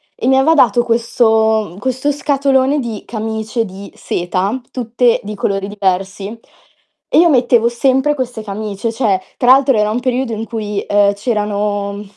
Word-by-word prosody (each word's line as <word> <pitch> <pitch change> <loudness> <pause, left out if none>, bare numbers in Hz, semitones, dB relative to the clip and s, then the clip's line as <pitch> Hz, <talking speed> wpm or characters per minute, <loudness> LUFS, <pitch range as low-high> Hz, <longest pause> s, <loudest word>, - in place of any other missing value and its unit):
e - - -3
mi 265 0 +4
aveva 285 +5 +4
dato 240 -6 +4
questo 220 -4 +1
questo 260 +4 -1
scatolone 280 -1 +1
di 230 -5 -5
camicie 220 +1 -3
di 195 0 -10
seta, 185 +7 -2
tutte 240 -1 +1
di 210 +1 -6
colori 195 -1 -2
diversi 195 +1 -2 0.7
e - - +1
io 340 0 +5
mettevo 240 -4 +3
sempre 265 +4 +1
queste 250 -5 -4
camicie, 210 +1 -4
cioè, 215 -5 0 0.2
tra 250 0 +4
l'altro 270 -2 +5
era 210 0 +2
un 220 +3 -1
periodo 255 -1 -1
in 220 +1 -4
cui, 210 -3 -4
uhm, 205 0 +3
c'erano 205 -2 -2
225 Hz, 155 wpm, -16 LUFS, 205-255 Hz, 0.7 s, io